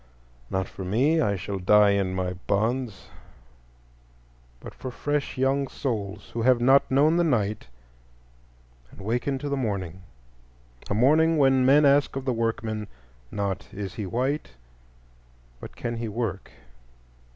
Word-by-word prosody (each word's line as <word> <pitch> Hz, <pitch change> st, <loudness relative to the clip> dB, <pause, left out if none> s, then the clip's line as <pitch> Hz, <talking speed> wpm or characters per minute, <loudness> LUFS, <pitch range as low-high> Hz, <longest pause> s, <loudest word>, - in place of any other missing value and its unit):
Not 95 Hz, -1 st, -1 dB
for 95 Hz, -, -8 dB
me,—I 115 Hz, -, +2 dB
shall 100 Hz, +1 st, -4 dB
die 105 Hz, +2 st, +5 dB
in 95 Hz, -2 st, 0 dB
my 90 Hz, -1 st, -2 dB
bonds,—but -, -, -7 dB
for 130 Hz, -, -7 dB
fresh 145 Hz, +3 st, -3 dB
young 135 Hz, +1 st, +1 dB
souls 105 Hz, -7 st, -4 dB
who 115 Hz, -, -2 dB
have 125 Hz, +1 st, +4 dB
not 135 Hz, +3 st, +4 dB
known 150 Hz, +5 st, +3 dB
the 175 Hz, -, +3 dB
night 110 Hz, -, 0 dB, 1.2 s
and -, -, -17 dB
waken 120 Hz, +7 st, -1 dB
to 145 Hz, -, -5 dB
the 140 Hz, -, -1 dB
morning; 95 Hz, -8 st, -3 dB, 0.9 s
a 100 Hz, -, 0 dB
morning 155 Hz, +8 st, +4 dB
when 135 Hz, -2 st, +4 dB
men 145 Hz, +2 st, +6 dB
ask 140 Hz, 0 st, +3 dB
of 135 Hz, -1 st, -4 dB
the 130 Hz, -, +1 dB
workman, 115 Hz, -2 st, -2 dB, 0.4 s
not 100 Hz, -1 st, -4 dB
"Is 95 Hz, -2 st, -6 dB
he 105 Hz, -3 st, -5 dB
white?" 130 Hz, -, -2 dB, 1.1 s
but -, -, -10 dB
"Can 120 Hz, -1 st, -4 dB
he 115 Hz, 0 st, -3 dB
work?" 105 Hz, -3 st, -4 dB
110 Hz, 135 wpm, -25 LUFS, 95-135 Hz, 1.2 s, men